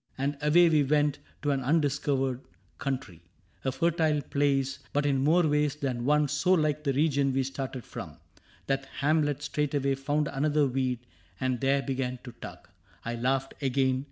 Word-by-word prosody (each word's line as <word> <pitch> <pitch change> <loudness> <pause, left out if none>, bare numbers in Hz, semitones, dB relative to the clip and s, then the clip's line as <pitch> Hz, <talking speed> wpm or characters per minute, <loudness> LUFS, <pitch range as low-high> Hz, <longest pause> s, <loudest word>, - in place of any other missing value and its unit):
And 140 +2 -1
away 165 +4 +5
we 155 -2 +4
went 145 0 +2 0.2
to 145 - +2
an 135 -1 0
undiscovered 135 -2 +1 0.4
country 130 - -4 0.2
— 90 - -36
A 130 - 0
fertile 155 0 +1
place, 140 -1 0
but 145 0 +1
in 135 -2 +2
more 165 +4 +4
ways 150 -1 +1
than 130 -5 -3
one 150 +1 +3
So 150 +7 +2
like 155 -3 +1
the 140 -2 +1
region 140 -1 +2
we 135 - +2
had - - -2
started 135 -2 -5
from. - - -8 0.5
That 135 0 -1 0.2
Hamlet 145 -1 +1
straightway 145 -2 0
found 145 +2 0
another 145 +2 +1
weed 125 -2 -1 0.3
And 130 -2 -1
there 135 +1 +2
began 130 -2 -2
to 125 - -8
tug. 120 - -11 0.4
I 115 - -2
laughed 130 +3 -1
again. 130 -1 +1
140 Hz, 170 wpm, -28 LUFS, 130-150 Hz, 0.5 s, away